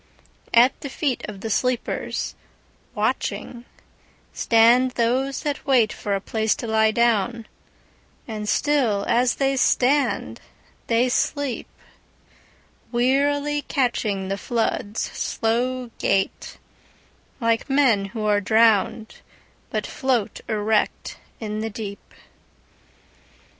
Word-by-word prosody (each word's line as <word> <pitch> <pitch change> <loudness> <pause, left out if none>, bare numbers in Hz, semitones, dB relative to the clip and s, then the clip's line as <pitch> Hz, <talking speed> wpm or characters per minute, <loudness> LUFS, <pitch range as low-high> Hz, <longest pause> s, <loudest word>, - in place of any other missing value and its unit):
At 245 +3 +5
the 280 - -5
feet 270 -2 -2
of 200 -2 -9
the 225 - -4
sleepers, 250 +2 -1 0.6
watching, 240 0 -2 0.7
Stand 235 +3 +4
those 255 +3 0
that 290 -1 -3
waitFor 225 -6 +1
a - - -1
place 220 +2 0
to - - -6
lie 220 -1 +3
down; 230 0 +1 0.8
and 210 -2 -4
still 250 -9 +1
as 245 +1 +2
they 275 0 +1
stand, 265 +2 +1 0.5
they 235 +2 +3
sleep, 275 +1 -1 1.2
Wearily 285 +4 +1
catchingThe 210 -8 -1
flood's 225 -2 -2
slow 245 +2 -1
gaitLike 225 +4 -3
men 260 -8 +3
who 215 +2 -5
are 205 -1 +2
drowned, 220 +1 +2 0.5
but - - -2
float 255 -6 -1
erect 215 0 0 0.2
in 215 -1 -4
the 220 +1 -2
deep. 200 -2 -8
235 Hz, 95 wpm, -23 LUFS, 215-255 Hz, 1.2 s, At